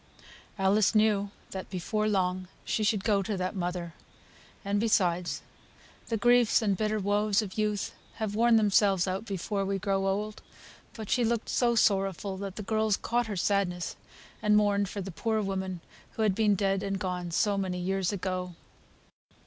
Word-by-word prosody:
Alice 200 +2 +3
knew 210 -2 +3 0.2
that 190 -1 -6
before 215 +4 -1
long 185 -2 0 0.2
she 220 - 0
should 210 -2 +1
go 205 -2 +2
to 200 +1 -3
that 185 +2 -2
mother; 175 -2 -3 0.7
and, 200 +1 +1
besides, 175 -8 +1 0.6
the 225 - -1
griefs 240 0 +4
and 200 -2 +2
bitter 215 +2 0
woes 205 +1 +1
of 190 -3 -8
youth 210 -2 -1 0.2
have 215 -2 -3
worn 230 +2 +4
themselves 200 -3 +3
out 190 +4 -2
before 200 0 -2
we 195 0 -1
grow 195 0 0
old; 210 +2 -2 0.5
but 220 -2 -7
she 245 - +3
looked 235 0 0
so 240 -1 +2
sorrowful 195 -3 +1
that 195 -1 -6
the 210 - -5
girls 215 -1 +1
caught 240 0 -1
her 205 -3 -4
sadness, 180 -2 0 0.5
and 210 0 +4
mourned 205 -2 +2
for 200 - -5
the 195 +1 -6
poor 220 +5 -1
woman 190 -3 -3 0.3
who 220 - -1
had 210 -3 +3
been 210 0 +3
dead 195 0 +1
and 195 -1 -2
gone 180 -2 -3
so 200 +4 +1
many 190 -2 -2
years 190 0 -1
ago. 185 -2 -3
200 Hz, 170 wpm, -29 LUFS, 190-215 Hz, 0.7 s, griefs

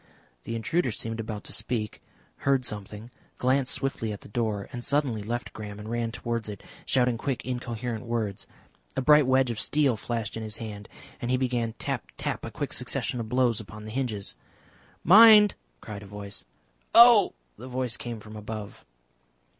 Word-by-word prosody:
The 115 - -3
intruder 130 +6 0
seemed 115 0 -4
about 110 -2 -5
to - - -6
speak, 110 -1 -2 0.4
heard 135 -2 +1
something, 105 +2 -6 0.3
glanced 130 +1 +2
swiftly 125 -5 -1
at 105 - -7
the - - -12
door, 105 -3 -1
and 120 -1 -5
suddenly 135 -6 +1
left 120 +4 -4
Graham 105 -2 -7
and 105 +2 -7
ran 115 -1 -1
towards 115 -2 -3
it, 100 -2 -8 0.2
shouting 125 -3 +2
quick 135 -1 -2
incoherent 120 -2 -4
words. 110 -4 -2 0.5
A - - +2
bright 150 -1 +6
wedge 130 -1 +3
of 110 - -4
steel 145 -5 +2
flashed 115 -1 -3
in 115 - -4
his 110 -1 -3
hand, 105 -2 -7 0.3
and 120 - -2
he 130 - +3
began 120 -3 -1
tap, - - -3
tap, - - -3
a - - -4
quick - - -4
succession 125 - -1
of 110 -2 -4
blows 125 -3 +2
upon 105 0 -10
the 110 - -7
hinges. 115 -5 -2 0.7
"Mind!" 210 +2 +9 0.3
cried 105 -2 -7
a 100 - -11
voice. 100 0 -7 0.5
"Oh!" 235 -4 +8 0.3
The 125 - -8
voice 125 -2 -1
came 120 -2 -5
from 110 +1 -11
above. 105 -1 -7
115 Hz, 175 wpm, -27 LUFS, 110-130 Hz, 0.7 s, Mind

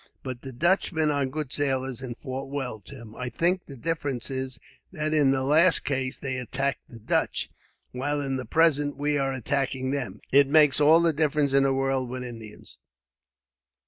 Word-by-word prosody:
"But 125 -2 -6
the 135 - -8
Dutchmen 160 +1 +1
are 140 -2 0
good 145 0 -4
sailors, 135 -3 -1
and 125 -2 -6
fought 135 -1 -6
well, 135 -5 -4
Tim. 115 -1 -12
I 125 -1 -4
think 175 +9 0
the 140 - -9
difference 140 -3 -2
is 130 -2 -4 0.3
that 155 -3 -2
in 150 -3 +4
the 135 0 +1
last 160 +4 +5
case 130 -2 -1
they 130 -2 -4
attacked 135 +2 -3
the 115 - -11
Dutch, 110 - -1 0.4
while 145 +4 -2
in 135 -2 -2
the 130 -1 -4
present 145 -3 +2
we 145 0 0
are 135 0 0
attacking 130 0 -2
them. 125 -8 -4
It 140 0 +6
makes 150 0 +5
all 160 +3 +6
the 165 -1 +2
difference 150 -2 +1
in 140 - +5
the 135 0 +2
world, 135 -1 0
with 125 0 -5
Indians. 115 -4 -11
135 Hz, 180 wpm, -26 LUFS, 130-150 Hz, 0.4 s, It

